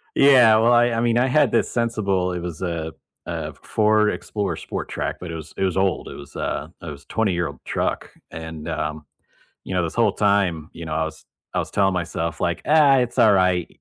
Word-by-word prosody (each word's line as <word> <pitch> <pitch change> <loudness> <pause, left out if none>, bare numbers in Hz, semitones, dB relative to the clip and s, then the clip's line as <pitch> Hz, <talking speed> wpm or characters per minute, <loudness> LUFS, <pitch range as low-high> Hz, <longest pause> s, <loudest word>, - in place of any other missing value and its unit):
Yeah, 125 -6 +7
well, 115 +2 +4
I 120 0 +5
I 115 - 0
mean, 120 0 +2
I 125 - +3
had 135 -2 +3
this - - +1
sensible 100 -6 0
it 90 - -3
was 85 -2 -6
a 85 -3 -3 0.3
a - - -4
Ford 105 0 +2
Explorer 100 -6 -3
sport - - -6
track, - - -3
but 90 - -7
it - - -5
was 80 -1 -8
it - - -3
was 95 -2 -1
old, 95 -1 0
it - - -8
was 70 -1 -12
a 75 +3 -3
it 85 - -6
was 70 -1 -10
a - - -45
twenty-year-old 85 -8 -1
truck, - - -2 0.2
and, 80 0 -7
um, 75 -1 -3 0.6
you 95 - -5
know, 90 - +2
this 80 - -4
whole 115 -4 +3
time, 100 -7 +1
you 85 - -8
know, 80 - -6
I 80 +1 0
was 80 - -8 0.3
I - - 0
was - - -2
telling 95 -1 +2
myself 85 -2 -3
like, - - -1
"Ah, 150 -3 +5
it's 125 -1 -1
all 110 - +6
right 90 -3 +2
95 Hz, 220 wpm, -22 LUFS, 80-110 Hz, 0.6 s, Yeah